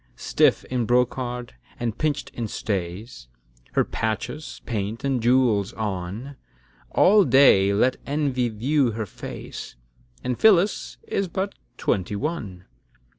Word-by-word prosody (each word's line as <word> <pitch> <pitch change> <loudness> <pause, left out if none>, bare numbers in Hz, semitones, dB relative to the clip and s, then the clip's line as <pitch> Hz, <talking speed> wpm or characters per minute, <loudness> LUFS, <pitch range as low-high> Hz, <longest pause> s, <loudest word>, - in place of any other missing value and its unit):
Stiff - - +2
in 125 -3 -1
brocard, 125 0 0 0.3
and 115 -2 -2
pinch'd 150 -2 -1
in 115 -2 -3
stays, 95 - -4 0.5
Her - - +3
patches, 115 +7 -4
paint, 110 +1 -3
and 135 -3 0
jewels 120 -5 +3
on; 105 +6 -4 0.5
All 205 +2 +5
day 125 - +6
let 125 +6 +2
envy 140 -4 0
view 125 +3 +1
her 110 0 -3
face; 95 - -8 0.5
And 125 -1 -2
Phyllis 205 -2 +3
is 195 - -1
but 190 +3 -3 0.2
twenty 100 +1 -1
one. 105 - -4
120 Hz, 120 wpm, -24 LUFS, 105-140 Hz, 0.5 s, day